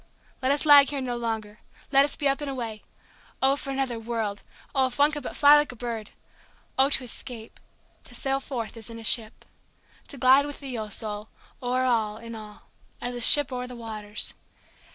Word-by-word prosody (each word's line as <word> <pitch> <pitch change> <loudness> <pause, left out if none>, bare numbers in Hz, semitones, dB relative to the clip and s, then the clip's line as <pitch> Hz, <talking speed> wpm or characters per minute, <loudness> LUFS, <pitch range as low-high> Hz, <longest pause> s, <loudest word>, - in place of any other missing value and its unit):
let 260 +1 +1
us 285 +2 0
lag 285 -2 +8
here 285 -1 -3
no 250 -2 -3
longer—let 230 +4 -1
us 290 - -2
be 285 - 0
up 275 +2 0
and 290 - -3
away!O 255 +2 -4
for 280 - -7
another 265 -4 -2
world! 225 -3 -3 0.3
O 265 -2 +3
if 250 - -8
one 290 +1 +5
could 295 -1 -5
but - - -7
fly 290 0 +7
like 295 -2 +2
a - - -12
bird!O 235 +3 -4
to 270 - +1
escape—to 235 -1 -10
sail 270 0 -1
forth, 245 -5 -5
as 225 0 -10
in 230 - -9
a 225 - -10
ship! 220 0 +2 0.6
To 280 - -11
glide 265 +3 +5
with 290 - -8
thee, 270 -3 -6
O 215 -2 -5
Soul, 210 0 -5 0.3
o'er 255 +1 0
all, 220 -4 0
in 230 +1 -9
all, 215 -2 -11 0.4
as 245 - -4
a 245 - -5
ship 290 +3 +7
o'er 250 0 -4
the 250 - -9
waters! 215 -3 -3
245 Hz, 190 wpm, -26 LUFS, 225-275 Hz, 0.6 s, lag